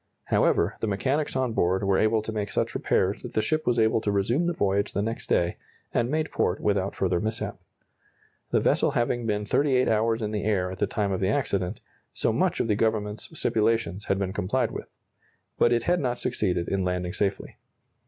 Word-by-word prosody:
However, 85 +5 +2
the 110 - -1
mechanics 130 +10 -1
on 130 -3 0
board 95 0 +1
were 95 -1 +2
able 110 0 +2
to 110 - -4
make 105 -2 -3
such - - -1
repairs 95 +3 0
that 125 - -8
the 110 - +3
ship 155 +7 -1
was 120 -1 +2
able 110 0 +3
to 105 - 0
resume 115 - +1
the - - +2
voyage 100 -7 0
the 100 - 0
next 115 +2 -4
day, 85 0 +1 0.4
and 120 - +1
made 155 +2 -1
port 90 - 0
without 100 -1 0
further 90 -2 +1
mishap. 110 +3 -3 0.9
The - - +3
vessel - - +2
having 120 0 0
been 105 -1 -1
38 130 +1 +2
hours 115 +1 +1
in 105 - -2
the 105 -1 -2
air 95 -3 0
at 95 - -8
the 105 - +2
time 100 0 -1
of 95 - -1
the 95 - +1
accident, 100 -7 -1 0.3
so - - +1
much - - +1
of - - +1
the 105 - +2
Government's 110 -1 -1
stipulations 110 -4 +1
had 95 - +1
been 95 -1 -2
complied 115 +5 0
with. - - -7 0.7
But 120 - +4
it 120 -1 +2
had 175 +5 +2
not 125 -3 -1
succeeded 95 -9 -1
in 95 -1 0
landing 90 -1 -2
safely. 100 -1 -2
105 Hz, 205 wpm, -26 LUFS, 95-120 Hz, 0.9 s, But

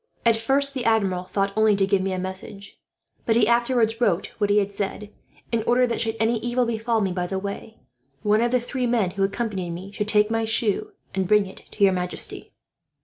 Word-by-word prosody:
At 230 -1 +5
first 275 +5 +2
the 260 -3 -3
Admiral 195 -6 +1
thought 195 +1 -1
only 220 -1 +4
to 195 -1 +2
give 195 -1 +1
me 190 0 -1
a 185 - -2
message; 190 +2 -7 0.5
but 225 - +3
he 225 -2 +4
afterwards 235 -1 +2
wrote 195 -6 +1
what 205 -1 +1
he 205 - +3
had 200 -1 +1
said, 200 +1 -4 0.4
in 230 -1 +1
order 250 +1 +4
that, 235 -2 -2
should 225 -1 -1
any 225 +1 +1
evil 240 +2 0
befall 225 0 0
me 195 -2 0
by 180 0 -2
the 190 - -3
way, 200 +3 -6 0.5
one 210 +1 +3
of 240 - +2
the 250 +1 +2
three 250 +1 -2
men 225 -6 +1
who 195 +1 -5
accompanied 195 -3 -2
me 180 +4 -7
should 210 0 -3
take 210 0 +3
my 225 0 +1
shoe 220 -2 0 0.2
and 190 -1 -1
bring 210 0 +4
it 190 - -11 0.2
to 205 - 0
your 195 -1 +6
majesty." 180 0 -3
210 Hz, 220 wpm, -24 LUFS, 195-230 Hz, 0.5 s, your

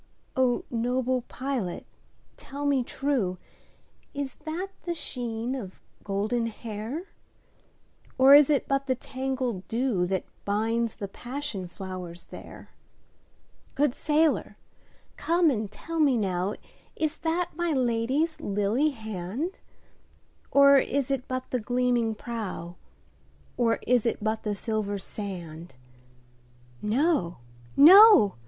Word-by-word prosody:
O 255 -2 +2
noble 250 +2 0
pilot 255 -9 -3 0.5
tell 285 +1 -7
me 275 -3 +2
trueIs 240 -9 -1 1.1
that 345 +5 -3
the 345 -1 -3
sheen 240 -5 -4
of 205 -9 -7 0.2
golden 215 +4 -1
hair? 230 - -6 1.1
Or 265 +1 +8
is 290 0 +8
it 290 -2 +2
but 275 0 0
the 260 - +2
tangled 260 -6 -3
dewThat 195 -7 0 0.2
binds 225 +3 0
the 200 - -5
passion 245 -3 -5
flowers 180 -1 -7
there? - - -12 1.0
Good 280 -2 +2
sailor 310 +2 +1 0.6
come 330 +1 +3
and 215 -5 -2
tell 330 +10 -6
me 280 -5 +4
nowIs 205 - -3
that 340 +2 -1
my 345 0 -1
Lady's 260 +5 0
lily 210 +9 +1
hand? 220 - -5 0.9
Or 280 0 +7
is 275 0 -1
it 270 -1 -2
but 255 0 -4
the 250 - 0
gleaming 245 -1 +1
prow, 210 -7 -6 0.8
Or 230 -2 +2
is 245 -2 +3
it - - 0
but 220 0 -1
the 210 -1 -2
silver 210 -1 -2
sand? 175 -6 -7 1.1
No! 220 - +1 0.4
no! 350 - +9
245 Hz, 110 wpm, -27 LUFS, 210-280 Hz, 1.1 s, no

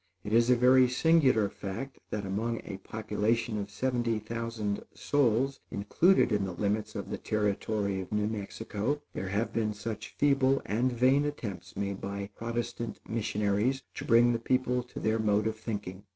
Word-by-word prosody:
It 105 - -4
is 115 +1 +5
a 125 - +7
very 125 +1 +6
singular 130 -6 +4
fact 100 +7 -6
that 105 -2 -3
among 110 +4 -1
a 100 - -5
population 110 +2 -1
of 100 0 -4
seventy 120 +1 0
thousand 110 -1 -3
souls 135 -1 +1
included 125 - +3
in 105 -2 +2
the 95 -2 -3
limits 105 +3 -1
of - - -5
the - - -3
Territory 105 -1 -1
of 95 - -9
New 105 0 +1
Mexico, 110 +4 -3
there 95 - -4
have 105 +4 -1
been 110 -2 0
such 110 0 -6
feeble 135 -1 +3
and 120 +5 +1
vain 130 +4 +4
attempts 100 -12 -5
made 100 -1 -2
by 100 +1 -4
Protestant 115 0 -4
missionaries 110 +3 0
to - - -6
bring 120 +1 +5
the 115 - -1
people 125 +1 +1
to 125 - -9
their 110 +1 +1
mode 105 -1 +2
of 110 0 0
thinking. 100 -4 -5
110 Hz, 165 wpm, -30 LUFS, 105-125 Hz, -, a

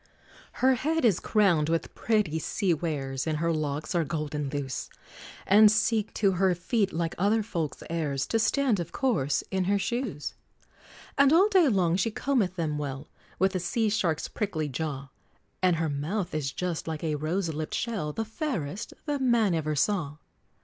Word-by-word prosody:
Her 260 +1 +3
head 310 +4 0
is 200 -7 +4
crowned 175 -8 +2
with 165 0 -1
pretty 210 -8 0
sea 185 +3 0
wares, 145 -4 -3
And 155 -1 0
her 165 +1 +1
locks 150 -1 -2
are 170 -2 +2
golden 150 -2 -3
loose, 135 -2 -4 0.6
And 210 +2 +7
seek 220 0 +1
to 200 -2 +3
her 185 0 +2
feet, 195 +3 0
like 165 0 -2
other 210 +4 +2
folks' 170 -8 -4
heirs, 150 -5 -1
To 225 - 0
stand, 220 0 +2
of 170 - -4
course, 205 - 0
in 190 -1 0
her 200 +2 +2
shoes! 225 - -3 0.9
And 280 0 +6
all 370 +6 +6
day 375 -6 +5
long 180 -7 +2
she 195 +4 +1
combeth 220 -6 0
them 155 -4 -2
well, 140 0 -5 0.3
With 190 0 +2
a 185 - 0
sea 220 +5 0
shark's 180 -7 0
prickly 170 -8 -2
jaw; 140 0 -4 0.5
And 180 -2 +4
her 165 0 0
mouth 170 +7 -2
is 145 -3 -1
just 175 +3 -3
like 160 -1 -4
a 155 -2 0
rose 160 +3 -1
lipped 155 +1 -4
shell, 210 -10 -2
The 225 +8 -3
fairest 220 - -4
that 290 -3 -1
man 235 -7 +3
e'er 155 -2 -1
saw! 150 -1 0
175 Hz, 175 wpm, -28 LUFS, 155-215 Hz, 0.9 s, And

